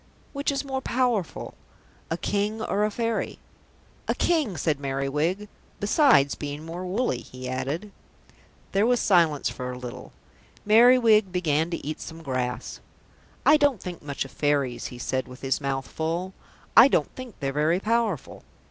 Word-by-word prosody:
"Which 280 0 0
is 280 0 -2
more 265 -1 -3
powerful, 240 -9 -1 0.6
a 165 - -1
King 205 +4 -1
or 210 -1 0
a - - 0
Fairy?" 230 +1 -2 0.7
"A - - +1
King," 305 - +1
said 145 -1 0
Merriwig. 145 +8 -1 0.3
"Besides 205 - +4
being 145 +1 -6
more 170 +2 -6
woolly," 190 - 0
he 130 0 -9
added. 145 +10 -3 0.8
There 200 +3 +3
was 245 -1 +3
silence 170 -8 +3
for 125 -1 -4
a 125 - -7
little. 125 -1 -8 0.5
Merriwig 220 -2 +6
began 165 -3 +1
to 170 - -5
eat 155 +1 -4
some 165 0 -9
grass. 130 -3 -3 0.7
"I 305 - +7
don't 285 -6 +2
think 175 -1 -7
much 140 -2 -4
of 135 - -11
Fairies," 140 -4 0
he 125 - -9
said 130 +2 -2
with 125 0 -12
his 135 +2 -1
mouth 135 -2 -2
full. 170 +7 -3 0.4
"I 230 +4 +10
don't - - +1
think 255 -4 -9
they're 135 -1 -2
very 155 +5 +2
powerful." 220 - -1
170 Hz, 155 wpm, -26 LUFS, 140-220 Hz, 0.8 s, I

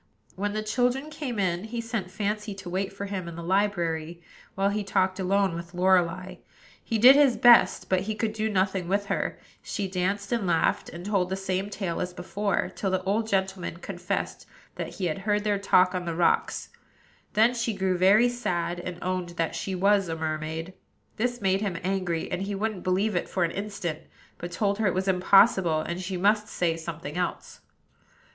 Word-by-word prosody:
When 205 +2 -2
the 215 0 -2
children 250 +6 0
came 285 -7 -4
in, 185 -1 0
he 235 +2 -5
sent 230 -5 -3
Fancy 210 +1 -3
to 190 -2 -8
wait 190 +2 -1
for 200 +1 -6
him 195 -3 -4
in 170 - -7
the 170 - -7
library, 170 -4 0 0.4
while 195 +1 +2
he 205 +1 -1
talked 190 -1 0
alone 195 0 +2
with 170 +1 -7
Lorelei. 185 0 +2 0.5
He 225 - -1
did 250 +5 +9
his 280 -5 +5
best; 240 -1 +6
but 185 - +2
he 215 +3 -3
could 215 0 -1
do 220 0 -1
nothing 190 -2 0
with 200 +2 0
her, - - -2 0.2
she 200 -2 -3
danced 195 +2 -2
and 230 -5 0
laughed, 165 -2 +1
and 170 +2 -9
told 195 -3 +1
the 190 - -1
same 195 +1 -2
tale 190 -4 -3
as 180 0 -4
before, 200 +3 -1
till 195 - -1
the 185 0 -1
old 210 +4 0
gentleman 190 -4 -1
confessed 175 0 -4 0.3
that - - -6
he 190 - -2
had 165 +1 -1
heard 205 +1 0
their 205 -2 +1
talk 185 -2 +4
on 180 -1 -3
the 170 -1 -3
rocks: 170 0 +1 0.6
then 225 +3 +4
she 235 -1 -1
grew 190 -2 0
very 200 +6 +5
sad, 180 -8 -2
and 175 0 -6
owned 185 -1 -2
that 165 -1 0
she 190 - -3
was 195 0 +3
a 165 - -2
mermaid. 160 +2 -4 0.4
This 245 +1 -1
made 195 0 +2
him 195 -5 -2
angry, 180 -3 -1
and 180 - -2
he 200 +1 -3
wouldn't 210 -1 -3
believe 190 +3 +1
it 175 - -1
for 185 - 0
an 170 - 0
instant; 200 -6 -4 0.4
but 175 - -6
told 200 +2 0
her 220 - +2
it 185 - 0
was 190 +1 -1
impossible, 190 -3 +4
and 170 +3 -4
she 185 0 -3
must 210 +3 +2
say 170 -5 0
something 165 -1 -6
else. 180 - -4
190 Hz, 195 wpm, -27 LUFS, 180-210 Hz, 0.6 s, did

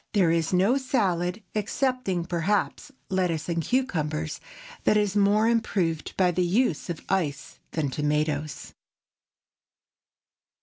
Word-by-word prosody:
There 185 -6 +4
is 165 -1 +1
no 195 +8 +3
salad, 195 -8 0
excepting, 215 -4 -1
perhaps, 185 - -1 0.2
lettuce 180 -5 0
and 170 -1 0
cucumbers, 160 - -1 0.4
that 210 - +4
is 205 -1 +1
more 205 +2 +4
improved 190 -8 0
by 180 -2 +4
the 180 - 0
use 180 - +1
of 170 - -5
ice 160 -7 -2
than 150 -4 -1
tomatoes. 150 -1 -1
180 Hz, 115 wpm, -26 LUFS, 160-210 Hz, 0.4 s, There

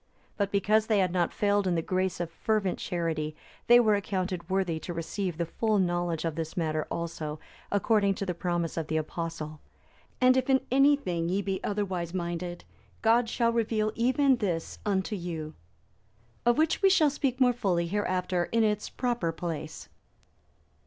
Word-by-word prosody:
But 200 -1 -1
because 210 +2 +2
they 215 - +3
had 185 -3 +2
not 175 -2 +1
failed 205 -1 +1
in 180 - +1
the 165 - 0
grace 185 0 -1
of 170 -1 -3
fervent 205 +1 0
charity, 160 -3 -2 0.3
they 240 0 +8
were 220 -3 +4
accounted 185 -3 -2
worthy 185 -4 0
to 175 +1 -6
receive 170 +1 -3
the 170 - 0
full 215 +5 0
knowledge 175 -3 0
of 165 - -1
this 160 +2 -5
matter 155 -2 -1
also, 160 -2 -4 0.3
according 205 -1 +2
to 200 - -3
the 180 - -1
promise 175 -1 -2
of 160 - -2
the 160 - 0
Apostle, 155 -1 -4 0.6
"And 255 0 +5
if 260 0 0
in 265 0 +4
any 275 +2 +6
thing 175 -10 -2
ye 195 +3 0
be 190 -1 -3
otherwise 190 -4 -2
minded, 175 0 -4 0.4
God 230 +1 +4
shall 235 -1 +1
reveal 220 -2 +1
even 260 +3 +3
this 175 -8 -3
unto 195 +1 0
you."(310) 165 -4 -5 0.9
Of 240 - +4
which 315 +1 +2
we 390 - +6
shall 315 -6 +4
speak 270 -3 -1
more 250 -1 +5
fully 185 -8 0
hereafter 180 -2 0
in 230 +3 +1
its 210 -1 0
proper 240 -9 -1
place. 165 -1 -5
185 Hz, 175 wpm, -28 LUFS, 170-220 Hz, 0.9 s, they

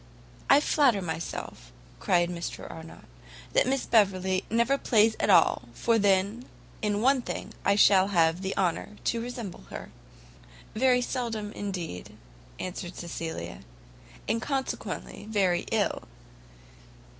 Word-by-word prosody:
"I 290 - +7
flatter 275 -9 +3
myself," 160 - -6 0.3
cried 175 -1 +2
Mr 170 -1 -5
Arnott, 165 0 -11 0.5
"that - - +3
Miss 270 0 0
Beverley 190 -3 +2
never 235 +4 +2
plays 220 -2 +3
at - - 0
all, 165 -9 +4
for 230 -1 +2
then, 200 +4 +2 0.4
in 210 0 0
one 265 0 +4
thing, - - -6
I 200 - +3
shall 195 -2 +6
have 170 -2 +2
the 190 0 -3
honour 190 +3 -1
to 230 - 0
resemble 235 - -7
her." - - -8 0.8
"Very 250 +2 +3
seldom, 230 -5 -3
indeed," 180 - -6 0.4
answered 180 -1 -6
Cecilia, 165 - -5 0.7
"and 225 +2 0
consequently 265 -5 -4
very 190 -5 +1
ill." - - 0
200 Hz, 120 wpm, -28 LUFS, 175-230 Hz, 0.8 s, I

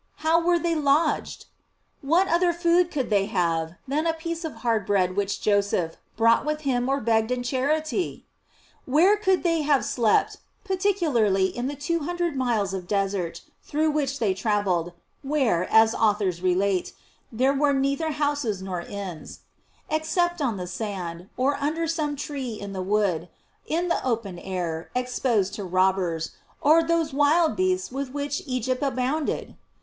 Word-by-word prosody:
How 330 +1 +4
were 350 0 +3
they 340 0 0
lodged 300 0 +1
?J - - -15 0.6
What 335 +7 +3
other 345 0 +2
food 345 +1 +3
could 270 -8 -3
they 200 -1 +3
have, 165 -5 0
than 300 +5 0
a 325 - +1
piece 335 +1 -5
of 320 - -4
hard 225 -3 +2
bread 185 -3 +1
which 200 0 -1
Joseph 200 -5 +1 0.2
brought 230 0 +4
with 305 0 -2
him 255 -3 0
or 275 +1 +1
begged 220 -1 +1
in 250 -1 -1
charity? 310 +7 -1 0.6
Where 330 +10 +4
could 380 -3 +1
they 330 -2 +2
have 285 -2 +2
slept 230 -4 +2 0.3
(particularly 310 - +1
in 245 +1 -2
the 290 - -4
two 335 +4 -1
hundred 345 0 -2
miles 230 -7 0
of 185 -2 -5
desert 195 -4 -1 0.2
through 310 +1 0
which 280 -2 -1
they 215 -7 +1
travelled, 190 -4 0 0.3
where, 265 - 0
as 220 0 +6
authors 205 -6 +1
relate, 185 0 +1 0.4
there 255 +4 +2
were 285 +1 +2
neither 275 +3 0
houses 285 -8 -1
nor 190 -2 -4
inns) 185 -3 -7 0.5
except 345 +2 0
on 240 -7 0
the 180 - -4
sand, 180 -3 -5
or 275 +3 +1
under 310 +4 -1
some 310 -3 -1
tree 275 -4 -4
in 200 -2 -7
the 190 - -3
wood, 185 -4 0 0.4
in 340 +3 0
the 340 - 0
open 220 -8 -2
air, 175 -3 -4
exposed 245 -5 0
to 205 - -5
robbers, 185 -3 +1 0.3
or 315 +3 +5
those 330 -2 0
wild 305 +4 +3
beasts 370 -2 0
with 270 +1 -4
which 285 0 -3
Egypt 255 0 -1
abounded 275 +2 -1
255 Hz, 160 wpm, -25 LUFS, 200-310 Hz, 0.6 s, as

